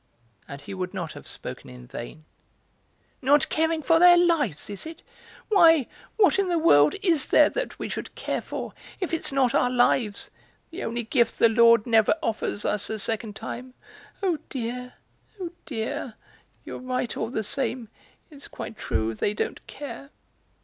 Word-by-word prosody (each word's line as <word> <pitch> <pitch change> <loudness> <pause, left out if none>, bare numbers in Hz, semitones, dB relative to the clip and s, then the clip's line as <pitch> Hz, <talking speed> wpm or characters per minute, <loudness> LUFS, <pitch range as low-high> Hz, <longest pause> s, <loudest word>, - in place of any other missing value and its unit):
And 140 0 -8
he 145 - -8
would 185 +1 -4
not 170 -4 -4
have - - -12
spoken - - -7
in 60 -1 -12
vain. 145 - -9 1.0
"Not 285 +2 +3
caring 320 0 0
for 325 +4 +4
their 350 0 +8
lives, 325 - +1
is 205 +8 -5
it? 325 +1 -10 0.5
Why, 330 - +6 0.3
what 400 -2 +4
in 390 -2 +1
the 345 - +2
world 150 - +5
is 330 -8 +3
there - - +5
that - - -4
we - - -4
should - - -6
care - - -3
for - - -6 0.3
if 365 -3 -3
it's 325 - 0
not 265 -3 +2
our 250 - +3
lives, 245 -4 +1 0.4
the 335 - -6
only 235 +1 -3
gift 235 +1 +1
the 230 - +5
Lord 230 -1 +5
never 225 +1 +4
offers 215 -2 -2
us 210 -1 0
a 220 - -2
second 215 0 -2
time? 250 +3 -7 0.5
Oh 350 -5 +1
dear, 250 0 -5 0.5
oh 350 -3 -5 0.2
dear; 250 -1 -4 0.5
you're - - -7
right 255 -2 -2
all 225 - -2
the 220 -3 -2
same; 250 0 -2 0.4
it's 285 -2 -10
quite 220 - -8
true, 110 +1 -1
they 205 - -1
don't - - -4
care! 275 -1 -8
250 Hz, 170 wpm, -25 LUFS, 215-315 Hz, 1.0 s, their